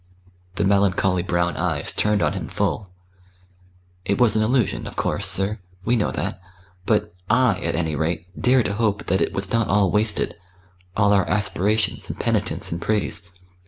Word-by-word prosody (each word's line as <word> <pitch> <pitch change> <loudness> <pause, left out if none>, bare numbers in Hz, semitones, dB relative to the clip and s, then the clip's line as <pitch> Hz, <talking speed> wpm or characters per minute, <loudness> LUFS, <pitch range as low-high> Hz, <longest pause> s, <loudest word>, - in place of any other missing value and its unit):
The 100 - 0
melancholy 95 -2 +2
brown 85 -1 0
eyes 80 -5 -1
turned 105 -1 +1
on - - +1
him - - -4
full. 100 -3 -2 1.1
"It 100 +1 -1
was 120 -4 +4
an 110 - +3
illusion, 120 0 +1
of - - -9
course, - - 0
sir 100 +3 +1 0.3
we 120 - +3
know 105 - +1
that. - - -3 0.5
But 105 -5 +1 0.2
I, 120 -3 +3
at 85 - -2
any 80 -2 -1
rate, 80 +2 -1
dare 125 0 +3
to 100 - -2
hope 105 -1 0
that 95 - +1
it - - +1
was 95 0 -4
not 115 -2 +2
all 100 -2 +3
wasted 105 0 0 0.6
all 105 -1 +4
our 100 -2 +2
aspirations 105 +1 0
and - - -6
penitence - - -1
and 85 +1 -3
praise. 100 -3 -1
100 Hz, 170 wpm, -23 LUFS, 90-110 Hz, 1.1 s, was